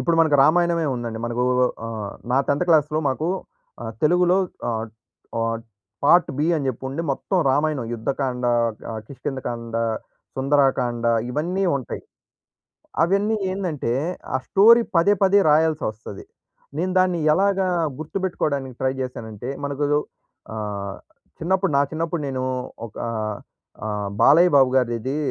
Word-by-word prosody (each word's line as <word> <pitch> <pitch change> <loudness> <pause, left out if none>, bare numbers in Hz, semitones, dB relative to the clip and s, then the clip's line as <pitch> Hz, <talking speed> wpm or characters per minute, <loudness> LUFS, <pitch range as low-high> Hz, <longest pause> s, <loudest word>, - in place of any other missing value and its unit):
ఇప్పుడు 170 -1 +1
మనకు 155 -3 +4
రామాయణమే 170 +1 +3
ఉందండి. 115 -2 -4
మనకు 120 +1 -1 0.4
ఆహ్, 110 -3 -5 0.2
నా 135 - +4
10థ్ 145 +5 +2
క్లాస్‌లో 155 -2 +3
మాకు 155 +5 -1 0.5
ఆహ్, 115 -1 -5
తెలుగులో 180 +3 +4 0.3
ఆహ్, 115 -1 -2 0.5
ఆహ్, 115 0 0 0.5
పార్ట్-బి 155 -2 +4
అని 140 -3 -2
చెప్పి 130 -1 -4
ఉండి 150 +5 -3
మొత్తం 185 +7 -1
రామాయణం 145 -2 0
యుద్ధకాండ, 125 +1 -2 0.5
ఆహ్, 110 -1 -4
కిష్కింద 135 -1 -5
కాండ, 115 -1 -4 0.6
సుందరాకాండ 130 -4 +1 0.2
ఇవన్నీ 175 +8 -1
ఉంటాయి. 130 - -6 1.0
అవన్నీ 200 +5 +2
ఏందంటే, 175 -11 -2 0.4
ఆ - - +4
స్టోరీ 230 +4 +7
పదే 170 +5 +5
పదే 195 +1 +5
రాయాల్సి 155 0 +3
ఒస్తది. 105 -2 -10 0.5
నేను 185 +2 0
దాన్ని 180 -2 +2
ఎలాగా 195 +1 +2 0.3
గుర్తుపెట్టుకోవడానికి 150 -6 -2
ట్రై 130 0 +1
చేశానంటే 120 -1 -5
మనకు 140 +1 -1 0.7
ఆహ్, 100 -2 -4 0.4
చిన్నప్పుడు 185 0 +1
నా - - +5
చిన్నప్పుడు 165 0 -2
నేను 130 -1 -3 0.4
ఒకా 110 - -6 0.8
ఆహ్, 105 -1 -3
బాలయ్య 170 +5 +6
బాబు 135 -2 +5
గారిది 120 -2 +1
ఇది 130 +5 -2
140 Hz, 125 wpm, -23 LUFS, 120-170 Hz, 1.0 s, స్టోరీ